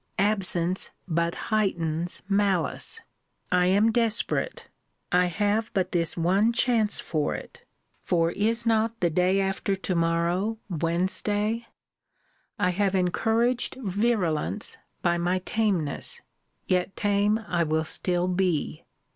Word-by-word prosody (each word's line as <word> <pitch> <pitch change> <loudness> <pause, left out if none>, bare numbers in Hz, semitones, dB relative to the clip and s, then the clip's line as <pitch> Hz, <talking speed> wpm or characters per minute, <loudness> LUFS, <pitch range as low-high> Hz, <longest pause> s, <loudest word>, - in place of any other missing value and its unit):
Absence 185 -3 0 0.2
but 170 0 0 0.2
heightens 175 -5 0
malice. 200 - 0 0.5
I 180 0 +3
am 205 +4 +4
desperate. 230 -1 0 0.4
I 180 0 +4
have 205 +5 0
but 190 -2 0
this 170 -2 0
one 195 +7 +2
chance 230 -3 +2
for 155 -3 -1
it; 480 0 -10 0.4
for 165 -2 +1
is 225 +5 -1
not 225 0 +1
the 170 -2 +1
day 180 +4 +2
after 195 0 0
to 190 -1 -3
morrow 170 +6 +1
Wednesday? 205 +7 0 0.9
I 180 - +2
have 195 +1 0
encouraged 225 +7 +1
virulence 205 - 0 0.3
by 175 -1 +2
my 175 +2 +1
tameness. 190 -10 0 0.5
Yet 180 +1 0
tame 205 +1 +2
I 175 -1 0
will 160 -1 +1
still 175 +2 0
be. 180 -4 -1
190 Hz, 115 wpm, -26 LUFS, 175-215 Hz, 0.9 s, am